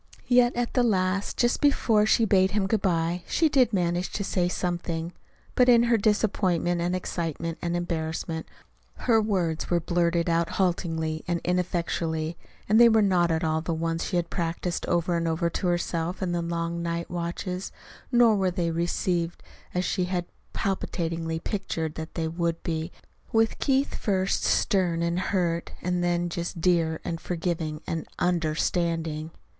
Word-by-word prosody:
Yet 245 Hz, -1 st, +4 dB
at 240 Hz, 0 st, -1 dB
the 250 Hz, -, +3 dB
last, 195 Hz, -3 st, +1 dB
just 240 Hz, 0 st, +2 dB
before 225 Hz, -7 st, +3 dB
she 225 Hz, +1 st, +4 dB
bade 190 Hz, -2 st, +4 dB
him 205 Hz, -2 st, +1 dB
good 210 Hz, +1 st, +1 dB
bye, 170 Hz, -1 st, 0 dB
she 320 Hz, -, +2 dB
did 260 Hz, -5 st, +4 dB
manage 175 Hz, -2 st, 0 dB
to 200 Hz, -, -2 dB
say 180 Hz, -2 st, 0 dB
something. 175 Hz, -2 st, -3 dB, 0.4 s
But 250 Hz, 0 st, +4 dB
in 235 Hz, -1 st, +7 dB
her 235 Hz, -1 st, +3 dB
disappointment 190 Hz, -5 st, +1 dB
and 175 Hz, +1 st, 0 dB
excitement 165 Hz, -2 st, -3 dB
and 175 Hz, 0 st, -1 dB
embarrassment, 160 Hz, -1 st, -3 dB, 0.6 s
her 225 Hz, -3 st, +5 dB
words 180 Hz, -7 st, -1 dB
were 175 Hz, -, +3 dB
blurted 170 Hz, 0 st, +1 dB
out 170 Hz, 0 st, +1 dB
haltingly 165 Hz, -4 st, -1 dB
and 175 Hz, -1 st, 0 dB
ineffectually, 170 Hz, -2 st, -1 dB, 0.3 s
and 215 Hz, +2 st, +5 dB
they 235 Hz, -, +9 dB
were 220 Hz, -1 st, +4 dB
not 180 Hz, -3 st, +3 dB
at 160 Hz, -1 st, 0 dB
all 160 Hz, 0 st, +1 dB
the 165 Hz, 0 st, -2 dB
ones 165 Hz, 0 st, -1 dB
she 185 Hz, -, -3 dB
had 170 Hz, -1 st, -1 dB
practiced 170 Hz, 0 st, -2 dB
over 175 Hz, 0 st, +1 dB
and 165 Hz, 0 st, 0 dB
over 165 Hz, +1 st, 0 dB
to 180 Hz, -, -2 dB
herself 175 Hz, +1 st, -1 dB
in 180 Hz, -, -1 dB
the 175 Hz, 0 st, 0 dB
long 170 Hz, 0 st, -2 dB
night 170 Hz, 0 st, -3 dB
watches; 175 Hz, +2 st, -4 dB, 0.4 s
nor 240 Hz, -3 st, +5 dB
were 190 Hz, -2 st, +2 dB
they 175 Hz, -2 st, -1 dB
received 170 Hz, 0 st, -1 dB, 0.3 s
as 180 Hz, 0 st, +1 dB
she 185 Hz, 0 st, 0 dB
had 180 Hz, -1 st, -2 dB, 0.3 s
palpitatingly 165 Hz, -4 st, -2 dB
pictured 165 Hz, -5 st, -3 dB
that 160 Hz, 0 st, -7 dB
they 165 Hz, -2 st, -1 dB
would 165 Hz, 0 st, -2 dB
be, 160 Hz, +1 st, -2 dB, 0.4 s
with 225 Hz, 0 st, +2 dB
Keith 270 Hz, 0 st, +1 dB
first 195 Hz, -3 st, 0 dB
stern 180 Hz, -5 st, +2 dB
and 170 Hz, +1 st, 0 dB
hurt, 175 Hz, -3 st, -1 dB
and 180 Hz, 0 st, -1 dB
then 175 Hz, 0 st, +1 dB
just 170 Hz, 0 st, -4 dB
dear 165 Hz, -2 st, +2 dB
and 165 Hz, -1 st, -3 dB
forgiving 160 Hz, -3 st, -3 dB
and 165 Hz, -1 st, -3 dB
UNDERSTANDING. 165 Hz, -1 st, 0 dB
175 Hz, 165 wpm, -26 LUFS, 165-190 Hz, 0.6 s, they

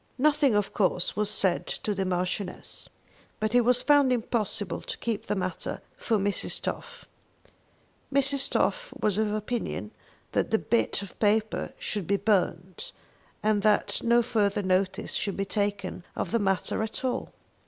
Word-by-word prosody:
Nothing, 285 Hz, -3 st, +3 dB
of 205 Hz, -1 st, 0 dB
course, 185 Hz, -3 st, +1 dB
was 210 Hz, 0 st, +1 dB
said 190 Hz, -4 st, +1 dB
to 210 Hz, -, -2 dB
the 195 Hz, -1 st, -1 dB
Marchioness, 185 Hz, +2 st, -3 dB, 0.5 s
but 215 Hz, +1 st, -1 dB
it 245 Hz, -, +6 dB
was 250 Hz, +1 st, +3 dB
found 290 Hz, -3 st, +5 dB
impossible 220 Hz, -4 st, -1 dB
to -, -, -6 dB
keep 225 Hz, -3 st, -3 dB
the -, -, 0 dB
matter 185 Hz, -1 st, -3 dB, 0.2 s
from 215 Hz, -4 st, 0 dB
Mrs. 205 Hz, -, 0 dB
Toff. 485 Hz, 0 st, -6 dB, 1.1 s
Mrs. 275 Hz, 0 st, +4 dB
Toff -, -, 0 dB
was 210 Hz, -1 st, +1 dB
of 215 Hz, -1 st, +1 dB
opinion 215 Hz, +3 st, -3 dB, 0.4 s
that -, -, 0 dB
the 220 Hz, -, +3 dB
bit 230 Hz, -3 st, 0 dB
of 195 Hz, -, -12 dB
paper 215 Hz, +1 st, +1 dB
should 205 Hz, -6 st, -4 dB
be 200 Hz, -, +2 dB
burned, 195 Hz, -, 0 dB, 0.5 s
and 210 Hz, -1 st, +2 dB
that 210 Hz, 0 st, +2 dB
no 235 Hz, +1 st, +4 dB
further 205 Hz, -4 st, +1 dB
notice 185 Hz, 0 st, 0 dB
should 200 Hz, -2 st, -1 dB
be 195 Hz, -, -1 dB
taken 200 Hz, -3 st, -2 dB
of -, -, -3 dB
the 230 Hz, -, +2 dB
matter 195 Hz, 0 st, 0 dB
at 220 Hz, +4 st, -3 dB
all. 255 Hz, -, -2 dB
210 Hz, 155 wpm, -27 LUFS, 195-240 Hz, 1.1 s, it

